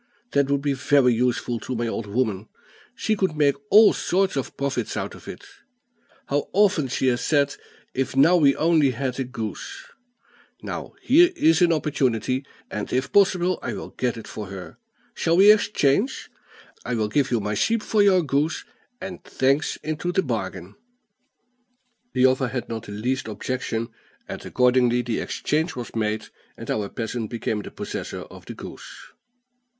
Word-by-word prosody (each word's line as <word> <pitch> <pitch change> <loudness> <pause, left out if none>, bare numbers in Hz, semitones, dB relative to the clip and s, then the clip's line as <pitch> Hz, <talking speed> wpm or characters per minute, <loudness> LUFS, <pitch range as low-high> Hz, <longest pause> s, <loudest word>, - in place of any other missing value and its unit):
That 140 -1 +2
would 140 0 +1
be 145 -1 +1
very 135 -2 +3
useful 120 0 0
to 130 - -5
my 120 0 -1
old 115 -1 -3
woman; 105 -2 -1 0.5
she 220 - 0
could 190 -6 0
make 145 -2 +4 0.2
all 215 +1 +8
sorts 190 -1 0
of 135 - -4
profits 140 -1 -2
out - - -3
of - - -14
it. - - -8 0.8
How 145 +1 -1
often 195 -8 +3
she 130 - -1
has 120 0 0
said, 145 -2 +2 0.4
'If 130 0 -2
now 150 +7 +6
we 145 -5 +5
only 160 -3 +3
had 130 +1 -3
a - - +1
goose!' 130 - -6 0.8
Now - - -6
here 340 +7 +6
is 165 - +3
an 175 -1 +5
opportunity, 130 -4 0 0.3
and, 105 - -4
if 130 +1 -1
possible, 185 -3 +3
I - - -3
will - - -6
get 125 -2 -2
it 115 - -9
for 105 -2 -7
her. 95 -1 -9 0.3
Shall 170 -5 +1
we 200 +2 +9
exchange? 205 - +1 0.5
I 125 - -2
will 110 -2 0
give 135 +5 +1
you 120 - +1
my 105 0 -2
sheep 220 - +1
for 215 - +2
your 190 -3 +5
goose, 145 +2 0 0.3
and 190 0 -7
thanks 135 +3 +1
into 155 +3 -2
the 190 +1 +1
bargain." 95 - -4 1.4
The 130 - +4
other 130 0 +3
had 125 0 -4
not 115 -1 -6
the - - -8
least 125 +5 -2
objection, 115 +1 -3 0.4
and - - -7
accordingly 125 -1 +2
the 120 -2 -2
exchange 160 +3 -1
was 120 -2 -7
made, 110 -1 -2 0.3
and - - -5
our 105 -2 -1
peasant 115 -1 -4
became 110 -2 -2
possessor - - -6
of - - -13
the - - -7
goose. - - -11
135 Hz, 165 wpm, -24 LUFS, 115-160 Hz, 1.4 s, we